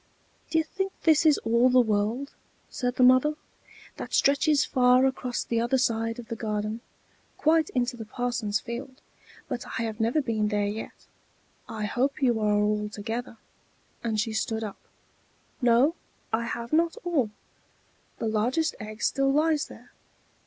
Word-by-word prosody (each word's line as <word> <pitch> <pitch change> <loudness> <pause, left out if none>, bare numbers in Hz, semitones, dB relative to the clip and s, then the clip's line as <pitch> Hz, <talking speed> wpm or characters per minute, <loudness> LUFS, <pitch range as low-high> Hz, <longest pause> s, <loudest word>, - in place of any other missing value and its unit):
"D'ye 320 -1 +2
think 385 +4 -3
this 320 0 +5
is 300 - +5
all 235 +3 +4
the 255 0 +5
world?" 225 +4 0 0.4
said 245 -1 -2
the 255 - +3
mother. 255 +4 +5 0.6
"That - - -4
stretches 285 +1 +3
far 250 0 +4
across 255 -2 -1
the 230 -1 -1
other 240 +3 +2
side 230 -3 0
of 240 -2 -9
the 230 - -4
garden, 215 0 -3 0.6
quite 315 0 +3
into 250 0 0
the 225 -2 -7
parson's 230 -2 -2
field; 255 +4 -7 0.5
but 240 - -4
I 230 - -1
have 220 -1 -4
never 230 +7 +2
been 225 -6 0
there 205 -1 0
yet. 210 +2 -6 0.6
I 215 -2 -3
hope 270 +7 0
you 240 -3 +3
are 210 -1 +2
all 210 0 0
together," 225 +3 -5 0.7
and 220 -2 -1
she 220 +1 -1
stood 220 0 -1
up. 210 -2 -6 0.8
"No, 245 +5 +4 0.4
I 230 +1 +1
have 235 +1 -5
not 330 +1 +2
all. 310 -11 +1 0.9
The - - -3
largest 245 +9 +1
egg 215 +1 -7
still 275 0 +2
lies 305 +1 +2
there. - - -14
240 Hz, 155 wpm, -27 LUFS, 220-270 Hz, 0.9 s, this